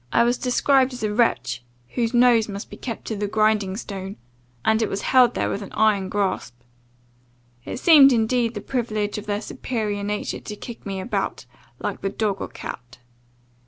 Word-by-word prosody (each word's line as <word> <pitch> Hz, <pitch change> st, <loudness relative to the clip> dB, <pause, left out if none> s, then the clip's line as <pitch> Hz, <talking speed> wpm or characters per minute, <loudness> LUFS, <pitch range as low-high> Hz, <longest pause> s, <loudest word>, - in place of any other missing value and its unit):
I -, -, +4 dB
was 240 Hz, +1 st, +1 dB
described 260 Hz, +1 st, +3 dB
as 245 Hz, -, -7 dB
a 210 Hz, -1 st, 0 dB
wretch, 130 Hz, -, +1 dB, 0.3 s
whose 230 Hz, -, -1 dB
nose 240 Hz, -3 st, +4 dB
must 200 Hz, +1 st, -7 dB
be -, -, -7 dB
kept 230 Hz, -3 st, -6 dB
to 220 Hz, -, -3 dB
the 205 Hz, 0 st, -2 dB
grinding 215 Hz, -2 st, +1 dB
stone 195 Hz, -3 st, -6 dB, 0.5 s
and 220 Hz, +1 st, +3 dB
it 220 Hz, -, +1 dB
was 195 Hz, -, -3 dB
held 250 Hz, -2 st, +5 dB
there -, -, 0 dB
with 200 Hz, -, -3 dB
an 200 Hz, -, -8 dB
iron 210 Hz, -3 st, +2 dB
grasp. 190 Hz, -11 st, -1 dB, 1.1 s
It -, -, -5 dB
seemed 290 Hz, -4 st, +8 dB
indeed 235 Hz, 0 st, +1 dB
the 205 Hz, -, -4 dB
privilege 215 Hz, -4 st, -2 dB
of 210 Hz, -, -11 dB
their 205 Hz, 0 st, -1 dB
superior 215 Hz, -4 st, -3 dB
nature 205 Hz, +1 st, -3 dB
to 210 Hz, -, -7 dB
kick 230 Hz, 0 st, -9 dB
me 195 Hz, -1 st, -3 dB
about, 190 Hz, +7 st, -3 dB, 0.3 s
like -, -, -4 dB
the 195 Hz, -, -1 dB
dog 200 Hz, -1 st, -2 dB
or -, -, -3 dB
cat. 120 Hz, 0 st, -9 dB
215 Hz, 185 wpm, -23 LUFS, 200-240 Hz, 1.1 s, seemed